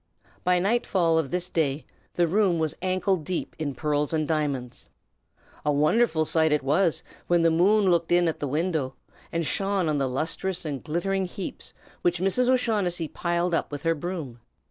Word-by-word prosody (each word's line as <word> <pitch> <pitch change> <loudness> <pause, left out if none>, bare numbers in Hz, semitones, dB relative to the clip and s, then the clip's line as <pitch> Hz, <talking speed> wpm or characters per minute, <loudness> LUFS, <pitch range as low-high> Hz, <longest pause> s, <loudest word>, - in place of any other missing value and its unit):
By 180 0 +3
nightfall 180 -4 +2
of 150 -4 -2
this 180 0 -1
day 145 -4 0 0.3
the 175 -1 +3
room 190 0 +2
was 160 -2 0
ankle 185 +1 +1
deep 170 +2 -4
in 145 -4 -3
pearls 150 +2 -1
and 155 -2 0
diamonds. 140 -6 -2 0.7
A 150 - +2
wonderful 155 +3 +2
sight 160 0 +2
it 150 -2 +2
was, 155 +5 +2 0.2
when 175 -1 +3
the 165 - +4
moon 190 +4 +4
looked 170 -1 +1
in 175 0 +4
at 160 - -2
the 145 - -2
window, 150 -2 -1 0.4
and 165 0 -1
shone 195 +1 0
on 150 -2 +1
the 135 -1 0
lustrous 165 +7 -2
and 140 -4 -4
glittering 190 +4 -1
heaps 185 +1 -7 0.3
which 175 0 +2
Mrs. 195 +7 +2
O'Shaughnessy 205 -10 +1
piled 175 0 -1
up 165 - 0
with 145 -1 -6
her 165 0 +3
broom. 160 -7 -5
170 Hz, 175 wpm, -26 LUFS, 150-185 Hz, 0.7 s, the